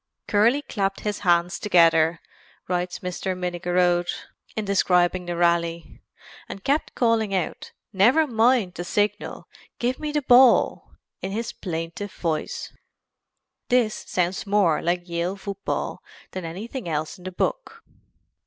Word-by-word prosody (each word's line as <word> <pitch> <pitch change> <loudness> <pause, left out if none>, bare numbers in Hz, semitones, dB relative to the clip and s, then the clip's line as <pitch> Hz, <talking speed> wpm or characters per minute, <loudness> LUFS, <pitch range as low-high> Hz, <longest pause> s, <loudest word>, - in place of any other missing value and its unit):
"Curly 235 +8 +3
clapped 195 -6 -2
his 210 -1 -2
hands 175 -2 +2
together," 165 -4 +4 0.5
writes 180 0 -2
Mr. 180 +1 -3
Minnigerode 175 0 +1 0.5
in 220 - -2
describing 180 -2 +2
the 175 - -2
rally, 170 -1 0 0.5
"and 195 - -8
kept 285 +3 0
calling 225 -4 +2
out 180 -4 -3 0.2
'Never 240 +12 +5
mind 230 -6 +2
the 175 - -5
signal! 205 +3 -2 0.3
Give 245 +2 -1
me 300 -1 -3
the 295 -1 -1
ball' 255 -1 +5 0.3
in 190 - -4
his 225 +3 -3
plaintive 170 +3 -5
voice" 160 -3 -3 1.0
This 245 -3 +3
sounds 180 +3 -2
more 195 -6 +3
like 175 +1 -1
Yale 170 +2 -2
football 200 0 -4 0.3
than 185 -2 -5
anything 200 +5 -6
else 155 +4 -3
in - - -15
the 185 - -4
book. 460 - -3
185 Hz, 130 wpm, -24 LUFS, 175-220 Hz, 1.0 s, Never